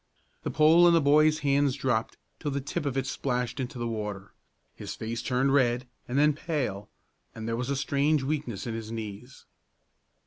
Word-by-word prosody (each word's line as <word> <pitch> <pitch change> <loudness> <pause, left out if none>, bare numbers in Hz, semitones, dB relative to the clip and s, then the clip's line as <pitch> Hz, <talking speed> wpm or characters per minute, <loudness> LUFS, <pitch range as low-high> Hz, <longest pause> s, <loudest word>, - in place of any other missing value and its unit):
The - - -3
pole 160 +3 +6
in 170 - +6
the - - +6
boy's 155 +1 +4
hands 140 -1 +3
dropped 130 -5 -1 0.2
till 150 - -3
the 140 0 -1
tip 145 +3 -3
of 135 -1 -2
it 135 - 0
splashed 125 -1 -2
into 130 +1 -4
the 120 - -3
water; 105 -3 -5 0.4
his - - -7
face 115 +1 -4
turned 130 +2 +1
red 125 -2 +2 0.2
and 125 - -2
then 150 +1 +5
pale, 130 - -3 0.5
and 110 0 -6
there 115 - -1
was 125 +2 -3
a 140 - 0
strange 140 +2 +1
weakness 135 -7 -3
in 115 - -3
his 110 -1 -6
knees. 110 +3 -7
130 Hz, 185 wpm, -28 LUFS, 115-145 Hz, 0.5 s, pole